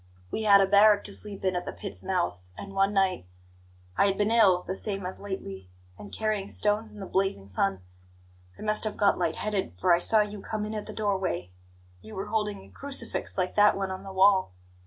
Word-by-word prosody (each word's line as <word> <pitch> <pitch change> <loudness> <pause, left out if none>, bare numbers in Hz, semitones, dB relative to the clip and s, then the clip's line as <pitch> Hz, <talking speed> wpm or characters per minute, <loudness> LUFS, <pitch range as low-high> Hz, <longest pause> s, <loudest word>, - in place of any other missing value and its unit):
We - - -2
had 200 -2 +6
a - - +5
barrack 205 +1 +5
to 200 - -1
sleep 200 -2 -5
in 185 -1 +1
at 180 - -2
the - - -4
pit's 200 - -6
mouth; 180 - -1 0.2
and 200 0 -8
one 195 +1 +2
night 190 - 0 0.7
I 200 - +4
had 195 - 0
been 210 +1 +1
ill, 195 -6 +4
the 185 - -4
same 195 -1 -3
as 185 - -6
lately, 100 - -7 0.3
and 205 - -11
carrying 215 -3 -2
stones 210 +2 0
in 210 - -12
the 195 - -6
blazing 190 - -1
sun 95 0 -1 0.8
I - - -9
must 215 0 +1
have 215 - -1
got 205 -3 +3
light 165 -2 0
headed, 205 - -2
for 175 - +3
I 170 - +4
saw 215 +4 +4
you 210 -1 -4
come 215 0 -4
in 215 - -5
at 210 -1 -5
the - - -6
door 205 -3 0
way. 90 - -3 0.5
You 220 - -11
were 195 +2 -5
holding 210 -2 -2
a - - -16
crucifix 270 -8 -4
like 185 -1 -1
that 210 -1 +5
one 195 -1 -2
on 185 0 -6
the 195 0 -9
wall. 190 - +3
200 Hz, 225 wpm, -27 LUFS, 185-210 Hz, 0.8 s, had